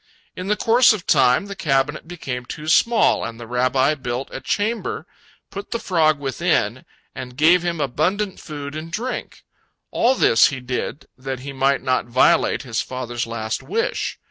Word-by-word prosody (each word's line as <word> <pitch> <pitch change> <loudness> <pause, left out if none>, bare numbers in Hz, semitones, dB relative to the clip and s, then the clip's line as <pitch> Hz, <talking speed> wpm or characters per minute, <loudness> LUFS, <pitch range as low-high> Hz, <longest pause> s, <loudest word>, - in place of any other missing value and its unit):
In 185 - -6
the 210 - +2
course 230 +3 +5
of 205 -5 -6
time, 130 +3 +4
the 200 -1 -7
cabinet 145 -1 0
became 135 -8 -5
too 150 +5 -8
small, 230 +7 +3
and 115 0 -6
the 120 - -7
Rabbi 130 +4 +2
built 130 -2 -4
a - - -6
chamber, 235 - -2 0.5
put 200 +1 -7
the 235 - -1
frog 160 -8 +2
within, 135 -3 -1 0.3
and 125 -1 -8
gave 170 +4 +5
him 170 -2 -2
abundant 180 +9 -1
food 145 -2 -7
and 160 +2 -6
drink. 245 +8 -5 0.5
All 250 +3 +3
this 115 - +5
he 140 -4 -4
did 125 +3 -4
that 130 -1 -5
he 140 +1 -7
might 135 +1 +1
not 130 -2 0
violate 125 +2 +3
his 120 -4 -2
father's 120 -2 -4
last 110 -1 -3
wish. 460 +3 -2
145 Hz, 170 wpm, -21 LUFS, 130-190 Hz, 0.5 s, course